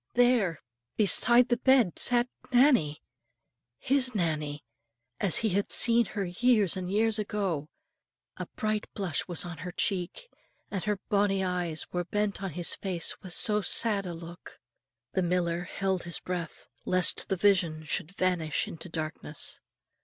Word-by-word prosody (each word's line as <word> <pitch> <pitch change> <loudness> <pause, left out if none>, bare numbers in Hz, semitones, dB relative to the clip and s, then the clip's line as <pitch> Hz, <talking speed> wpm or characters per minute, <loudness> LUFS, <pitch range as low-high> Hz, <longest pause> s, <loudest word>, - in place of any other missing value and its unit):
there, 240 -9 +3 0.4
beside 235 +4 +4
the 240 - +2
bed, 255 -8 +3
sat 240 0 +7 0.2
Nannie, 245 - +3 0.7
his 260 -2 +2
Nannie, 150 -5 -2 0.6
as 190 -5 +4
he - - +2
had 200 +1 -1
seen 235 0 +5
her 200 +1 -4
years 210 +1 +2
and 185 -1 -5
years 220 +2 +2
ago; 195 -8 -3 0.7
a - - -7
bright 215 0 -2
blush 185 -7 -2
was 175 -1 -1
on 175 -1 -8
her 180 - -6
cheek, 190 - -2 0.4
and 195 -1 -4
her 210 -1 0
bonnie 200 -1 +1
eyes 180 -3 -3
were 180 0 -1
bent 205 +2 -2
on 190 -5 -5
his 175 +1 -2
face 180 -4 -2
with 185 -2 -8
so 210 +1 +1
sad 205 -2 +1
a 175 - -5
look. 170 +1 -12 0.6
The 190 - +1
miller 175 -1 -1
held 190 0 -2
his 170 - -1
breath, 175 -3 -6 0.2
lest 180 -1 +1
the 195 - 0
vision 175 -5 +1
should 150 +1 -4
vanish 180 -5 -1
into 170 +2 -8
darkness. 155 -2 -5
190 Hz, 150 wpm, -28 LUFS, 170-210 Hz, 0.7 s, sat